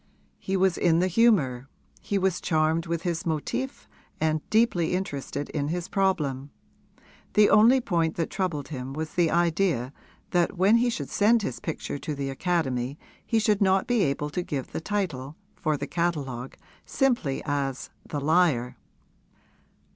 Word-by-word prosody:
He 190 0 -1
was 190 -1 +2
in 165 -2 +3
the 180 - +3
humour; 160 - +2 0.3
he 200 - -1
was 190 -2 0
charmed 160 +1 +1
with 170 0 -2
his 170 -2 -2
motif 170 - -3 0.3
and 155 -1 +1
deeply 215 -7 +2
interested 145 -6 -4
in 145 -2 -2
his 175 +2 -3
problem. 150 -9 0 0.9
The 210 0 +6
only 230 +5 +6
point 170 -7 0
that 165 - -2
troubled 170 -8 -2
him 135 -2 -5
was 155 +2 -4
the 175 -2 +2
idea 165 -6 +1 0.4
that 175 +1 +1
when 200 +5 +5
he 240 +1 +2
should 145 - -4
send 220 +2 +3
his - - -3
picture 160 -5 -4
to 150 - -4
the 140 -1 -3
Academy 135 -4 -1 0.3
he 225 - 0
should 210 -1 +2
not 190 -1 +3
be 245 -3 +1
able 150 -2 -1
to 180 - -2
give 145 -6 -4
the - - -4
title, 160 -8 -3 0.2
for 155 -1 -1
the 140 - -4
catalogue, 145 -8 -2 0.3
simply 240 - 0
as 140 -2 -2 0.2
'The 145 - -4
Liar.' 150 -6 +2
165 Hz, 155 wpm, -26 LUFS, 145-190 Hz, 0.9 s, The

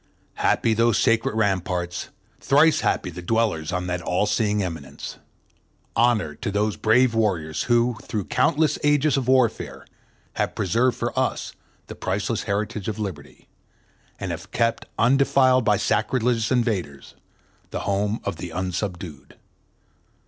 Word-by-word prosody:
Happy 115 - +2
those 115 0 +3
sacred 115 -1 +2
ramparts, 90 -4 -1 0.3
thrice 150 +4 +4
happy 90 - 0
the 90 +1 -8
dwellers 95 -5 0
on 90 0 -2
that 90 0 -2
all 90 +4 0
seeing 105 -2 +1
eminence. 75 -6 -7 0.8
Honor 115 -9 +2
to 75 - -5
those 105 +1 0
brave 120 +2 +3
warriors 90 -9 0
who, 120 -1 +3
through 105 -4 -4
countless 150 +4 +1
ages 145 0 +3
of 135 -3 -1
warfare, 130 -4 +1 0.5
have - - -1
preserved 115 +6 +1
for - - -2
us - - -1 0.3
the - - -8
priceless 105 +3 -2
heritage 105 -1 -2
of 110 -1 -3
liberty, 95 -9 -7 0.7
and 95 - -3
have 85 +3 -7
kept 115 +2 0
undefiled 130 0 +4
by 105 -2 +3
sacrilegious 115 +2 0
invaders 105 - -1 0.6
the - - -4
home 100 +2 -1
of 100 -4 -3
the 90 - -6
unsubdued. 90 -3 -5
105 Hz, 135 wpm, -23 LUFS, 90-120 Hz, 0.8 s, thrice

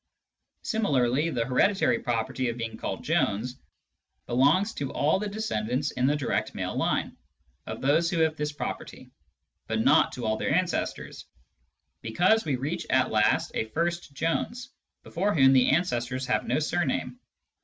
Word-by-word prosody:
Similarly, 150 - +1
the 120 -7 -1
hereditary 135 - +2
property 120 +2 -1
of 115 - -4
being 115 -1 -4
called - - -5
Jones 125 +6 0 0.7
belongs 150 - +3
to 140 -2 -4
all 155 +6 +1
the 210 - -3
descendants 140 - -2
(in 125 +1 0
the 145 - +2
direct 145 -4 -2
male - - -3
line) - - -1 0.5
of 110 - -6
those 155 +5 +2
who 175 - -2
have 160 -1 +2
this 150 -1 -2
property, 145 - -7 0.6
but - - 0
not - - +4
to 125 - -5
all 110 0 0
their 140 - 0
ancestors, 180 0 -2 0.7
because 180 - +2
we 145 -4 0
reach 150 +7 -4
at 130 0 +2
last 105 -1 +2
a - - -1
first 170 +7 -2
Jones, 235 - -2 0.3
before 195 +3 -1
whom 135 -3 +6
the 130 -1 +4
ancestors 130 -5 0
have 130 - 0
no - - +1
surname. 155 - -1
140 Hz, 155 wpm, -27 LUFS, 125-170 Hz, 0.7 s, whom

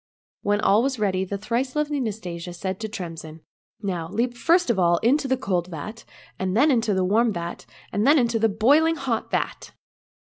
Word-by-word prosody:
When 205 0 +1
all 210 +1 +4
was 265 0 -1
ready 190 -3 0
the 200 +2 -4
thrice 245 +6 -2
lovely 300 -1 0
Nastasia 180 -7 -5
said 190 +1 -4
to 220 -1 -4
Tremsin, 165 -5 -7 0.2
" - - -44
Now, 175 -5 -3
leap 235 +5 -1
first 335 +3 +3
of 205 - -1
all 170 -1 +4
into 270 +4 +3
the 260 0 +1
cold 180 -8 -1
vat, 185 +7 -8 0.3
and 190 +2 -1
then 290 +5 +5
into 230 -5 +1
the 185 -1 +1
warm 225 +5 +3
vat, 170 -2 -6 0.3
and 210 +5 +1
then 300 +2 +6
into 235 -3 +2
the 225 0 +3
boiling 290 +11 +3
hot 260 -6 -2
vat - - -3
215 Hz, 200 wpm, -24 LUFS, 185-255 Hz, 0.3 s, then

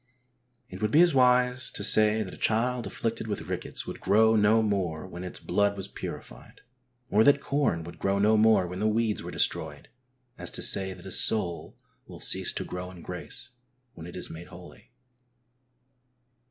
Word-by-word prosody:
It 95 - -10
would 105 - +1
be 155 +9 +6
as 175 -3 +3
wise 125 -1 +3
to 100 - -5
say 110 +1 +4
that 95 - -8
a - - -10
child 120 +2 0
afflicted 115 -1 -3
with 105 - -5
rickets - - -4
would - - -7
grow 110 +3 +4
no 110 +1 +4
more 95 -6 -2
when 90 -1 -8
its 90 - -7
blood 100 0 0
was 95 - -5
purified; - - -9 0.5
or 105 +2 +5
that 145 +2 +5
corn 140 - 0
would 85 - -11
grow 100 0 0
no 105 +2 +4
more 110 -3 +4
when 90 +1 -6
the 105 - +1
weeds 110 0 0
were - - -7
destroyed - - -2 0.5
as - - -2
to - - -2
say 95 -1 +1
that 90 0 -14
a 95 - -7
soul 90 -6 -2 0.3
will - - -11
cease - - +4
to - - -3
grow 90 0 -6
in 90 -2 -12
grace - - -7 0.4
when 80 0 -10
it 90 - -10
is 90 - -4
made 80 +2 -10
holy. 90 0 -14
105 Hz, 185 wpm, -27 LUFS, 90-110 Hz, 0.5 s, be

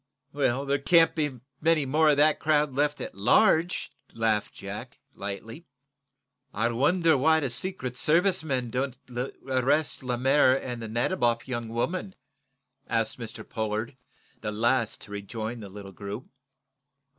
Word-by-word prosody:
"There 140 0 +1
can't 165 +3 +5
be 150 -5 -2 0.2
many 160 -2 +3
more 155 +4 +3
of 145 - +4
that 150 +1 +4
crowd 150 -2 +2
left 145 +2 +1
at - - -5
large," 160 - +3 0.2
laughed 110 -2 0
Jack, - - -7 0.2
lightly. 110 - -7 0.8
"I 115 +3 0
wonder 160 +7 +3
why 160 +4 +4
the 135 -5 -2
Secret 130 -3 -4
Service 175 +7 +3
men 130 -6 -2
don't 130 +1 -2
arrest 130 +4 0
Lemaire 130 +2 +3
and 120 -2 -5
the 115 - -5
Nadiboff 120 - 0
young 120 -3 -3
woman?" 180 - -2 0.7
asked 115 +1 0
Mr. 110 -1 -8
Pollard, 110 +2 -3 0.4
the 105 - -3
last 115 +2 +1
to 100 - -11
rejoin 110 +3 -5
the 100 -3 -8
little 100 0 -9
group. 100 +6 -6
130 Hz, 135 wpm, -27 LUFS, 115-150 Hz, 0.8 s, can't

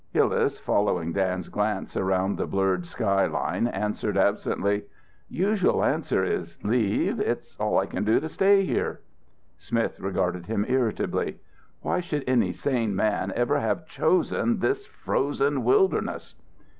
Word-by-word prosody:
Hillas, - - +2
following 90 -5 0
Dan's 95 -2 -1
glance 105 -1 -2
around 95 +1 +1
the - - -1
blurred 95 -2 0
sky 100 -3 +1
line, 80 - -1
answered 105 -1 -2
absently, 100 +1 +1 0.4
"Usual 195 +1 +1
answer 95 - +1
is 85 -2 -3
'Leave? 110 -1 +1
It's - - -2
all - - +1
I - - +3
can - - -3
do 110 +2 +3
to 160 - -4
stay 195 +3 +4
here.'" - - -2 0.6
Smith 115 +6 -2
regarded 90 -2 -2
him 105 -2 0
irritably. 125 -4 -1 0.4
"Why - - 0
should 150 -5 -3
any 120 -8 +2
sane 115 +1 -1
man 100 -1 0
ever 120 +5 +1
have 160 +3 -1
chosen 185 +9 +1
this 400 - -1
frozen 140 0 -1
wilderness?" 395 -1 +1
105 Hz, 135 wpm, -26 LUFS, 95-145 Hz, 0.6 s, stay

